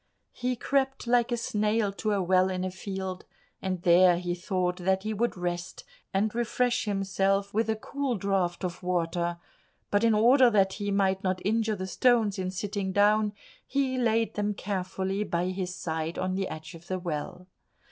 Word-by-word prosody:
He 250 0 -2
crept 270 +2 0
like 240 0 +2
a 240 - +1
snail 215 -2 0
to 210 +2 -2
a 195 -2 +1
well 185 +1 +3
in 185 -1 -2
a 185 - -3
field, 190 0 -5 0.4
and 185 -2 -3
there 175 0 +6
he 175 0 -2
thought 180 0 -1
that 190 +1 0
he 215 0 -2
would 230 0 -1
rest 175 0 -4 0.3
and 205 +2 +1
refresh 240 +1 0
himself 195 0 0
with 220 +1 +1
a 220 - +2
cool 270 +3 -3
draught 190 -2 0
of 180 -1 -4
water, 175 -1 -1 0.5
but 205 +2 +2
in 225 -2 +4
order 245 +4 +6
that 195 -3 +3
he 205 0 -3
might 195 -1 +1
not 185 -1 0
injure 220 +1 +1
the 185 -1 -4
stones 220 0 +2
in 185 -1 -1
sitting 195 +1 -3
down, 210 +1 +3 0.3
he 265 -2 0
laid 225 -2 +1
them 210 0 -1
carefully 190 0 -2
by 175 -2 -1
his 185 -1 -3
side 160 -1 -3
on 185 0 -1
the 190 0 -1
edge 155 +3 -8
of 165 0 -13
the 185 - -2
well. 175 +1 -5
195 Hz, 180 wpm, -28 LUFS, 185-215 Hz, 0.5 s, there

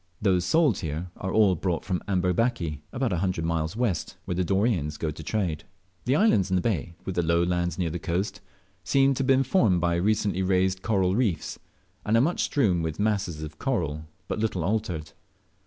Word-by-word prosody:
Those 90 -3 +2
sold 155 - +3
here 80 +3 -4
are 95 - -4
all 105 -3 +4
brought 90 0 -2
from 90 -3 -1
Amberbaki, 90 - 0
about 125 -5 -1
a 85 - 0
hundred 90 -3 -1
miles 80 +2 -1
west, 115 -8 -1
where - - -2
the 90 +1 0
Doreyans 95 -6 0
go 80 - -2
to 75 - -9
trade. 80 -3 -2 0.4
The 130 +2 +2
islands 125 - +3
in 95 - +1
the 90 - +2
bay, 85 -6 -1
with 95 - -3
the 90 - +1
low 85 +1 +2
lands 85 -1 -1
near 85 -3 -1
the 85 - -4
coast, 90 +5 -2 0.4
seem 135 0 +3
to 135 - -5
have 135 - 0
been 135 0 +4
formed 115 - +3
by 85 0 +1
recently 100 0 +1
raised 95 0 +1
coral 95 -4 +1
reef's, 105 -10 -1 0.4
and 110 +2 +2
are - - +5
much 165 +7 +1
strewn 100 - +2
with 80 +1 -3
masses 100 -7 -1
of 75 0 -8
coral 80 - -1 0.2
but - - -3
little 105 -6 -1
altered. 90 -5 -2
95 Hz, 200 wpm, -26 LUFS, 85-110 Hz, 0.4 s, are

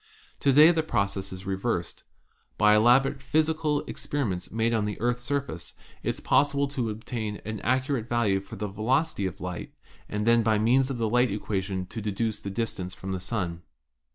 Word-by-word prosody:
To 140 - +3
day 150 +5 +8
the 165 -2 +1
process 100 -9 -1
is 95 0 -8
reversed. 95 -2 -2 0.6
By 105 0 +6
elaborate 135 +5 +4
physical 155 +1 +1
experiments 105 -12 -3
made 115 +1 +1
on 110 -2 +1
the 105 -1 -4
Earth's 120 +2 0
sur 140 +3 0
face 85 - -9 0.3
it - - -2
is - - -2
possible 140 0 +2
to 130 -5 -2
obtain 110 -1 -4
an 110 0 -4
accurate 130 0 0
value 110 -5 +2
for 100 - -10
the 105 - -3
velocity 110 +3 0
of 90 - -7
light 90 -1 -6 0.3
and 105 0 -2
then 115 0 +5
by 110 -1 +2
means 125 +5 +3
of 135 - -3
the 115 -1 0
light 125 +3 +3
equation 95 -2 -2
to 110 +5 -7
deduce 105 +1 -2
the 100 - -5
distance 95 -4 -3
from 95 - -6
the 95 - -2
Sun. 90 -4 -3
110 Hz, 185 wpm, -27 LUFS, 100-130 Hz, 0.6 s, day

